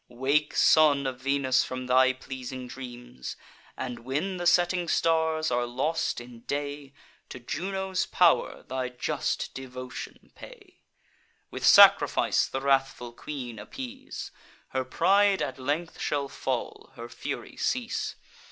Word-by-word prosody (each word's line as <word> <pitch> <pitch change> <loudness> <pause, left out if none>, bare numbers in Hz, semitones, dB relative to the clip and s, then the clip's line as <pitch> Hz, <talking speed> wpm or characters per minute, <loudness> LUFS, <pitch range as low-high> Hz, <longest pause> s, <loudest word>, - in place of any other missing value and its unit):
Wake, 140 +5 0
son 145 -3 +5
of 130 -1 -4
Venus, 135 -1 +2
from 130 0 -5
thy 130 +1 +5
pleasing 130 -1 -7
dreams; 120 - -8 0.4
And, 125 -2 -5
when 150 +10 -2
the 175 0 -1
setting 175 0 +3
stars 160 -1 +1
are 120 0 +1
lost 135 +7 -1
in 120 -1 -11
day, 145 -1 -4 0.3
To - - -7
Juno's 190 +8 -2
pow'r 175 -2 +3
thy 130 -1 -3
just 125 -1 -2
devotion 130 0 -8
pay; 410 -8 -14 0.7
With - - -6
sacrifice - - +6
the 135 - -4
wrathful 135 -3 0
queen 125 -4 -7
appease: 265 - -8 0.4
Her 130 0 -2
pride 195 +8 +3
at 135 -1 -5
length 150 +6 -2
shall 140 -1 -1
fall, 430 - -4
her - - -8
fury - - -6
cease. 245 -2 -2
140 Hz, 125 wpm, -27 LUFS, 130-170 Hz, 0.7 s, sacrifice